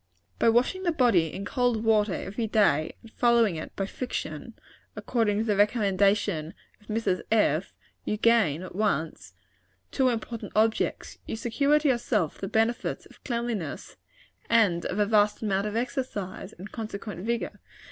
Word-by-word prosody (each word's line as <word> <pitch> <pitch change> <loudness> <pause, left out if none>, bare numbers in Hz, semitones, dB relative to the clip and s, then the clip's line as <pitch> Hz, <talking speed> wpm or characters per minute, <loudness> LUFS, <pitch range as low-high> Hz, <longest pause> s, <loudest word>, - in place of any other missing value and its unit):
By - - +4
washing 245 +11 +2
the 350 -2 +1
body 230 - +3
in 200 - -6
cold 245 -2 0
water 215 -3 +3
every 220 +3 -3
day, 195 -9 +2
and 225 - -14
following 235 -6 +3
it 155 - -7
by 195 - -1
friction, 245 +5 -5 0.4
according 225 -4 0
to 215 - +1
the 215 -2 +1
recommendation 200 -5 +2 0.3
of 210 - -23
Mrs. 215 -4 0
F., 195 -6 +2 0.3
you 210 - -2
gain, 210 -9 +3
at 185 - -9
once, 160 - -2 0.6
two 260 -1 +2
important 230 -1 -4
objects. 220 +1 0
You - - -3
secure 245 +6 +2
to 300 0 0
yourself 230 - 0
the 195 - -4
benefits 225 +4 0
of - - -19
cleanliness, 235 - -4 0.5
and 205 -7 +3
of 185 - -4
a 210 - +3
vast 210 0 +2
amount 200 -1 0
of 210 - -4
exercise, 235 -6 -3
and 195 +4 -10
consequent 210 -4 -6
vigor. 235 +1 -2
215 Hz, 155 wpm, -27 LUFS, 195-235 Hz, 0.6 s, By